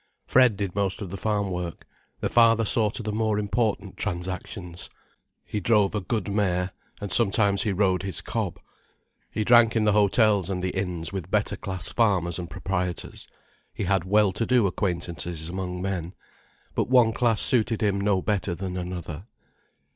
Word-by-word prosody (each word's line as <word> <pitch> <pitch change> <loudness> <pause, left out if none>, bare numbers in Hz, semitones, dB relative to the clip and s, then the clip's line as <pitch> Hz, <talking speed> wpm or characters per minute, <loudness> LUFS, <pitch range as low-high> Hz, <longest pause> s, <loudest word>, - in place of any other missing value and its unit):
Fred 125 -5 +4
did 100 -3 -3
most 100 -2 -1
of 90 - -7
the - - -5
farm 100 -1 -1
work, 90 -2 -5 0.4
the - - +1
father 115 -1 +4
saw 110 0 +2
to 115 - -6
the 105 - -2
more 110 0 0
important 105 -1 -1
transactions. 90 -1 -5 0.6
He 105 - -3
drove 105 -1 +3
a 105 - -1
good 105 0 -2
mare, 95 -3 0 0.3
and 100 -3 -2
sometimes 100 -2 +3
he 105 - 0
rode 95 -1 +1
his 95 -4 -2
cob. - - -3 0.7
He 110 - -2
drank 120 0 +5
in 110 -1 +2
the 105 - +4
hotels 105 -2 +3
and 95 -2 -2
the 90 0 -3
inns 90 -4 -3
with 95 -4 -5
better - - +1
class 95 -4 -4
farmers 95 -7 +1
and 85 -1 -6
proprietors, 90 -2 -4 0.5
he - - -3
had 95 -1 +1
well 105 +1 +3
to 115 - -2
do 125 -4 +4
acquaintances 85 -4 -3
among 90 0 -4
men. 90 -2 -3 0.6
But - - -1
one 125 -3 +5
class 115 -4 +2
suited 115 -3 +2
him 100 -1 +1
no 100 -2 +1
better 100 -4 -1
than 95 0 -5
another. 90 -1 -6
100 Hz, 170 wpm, -25 LUFS, 90-105 Hz, 0.7 s, drank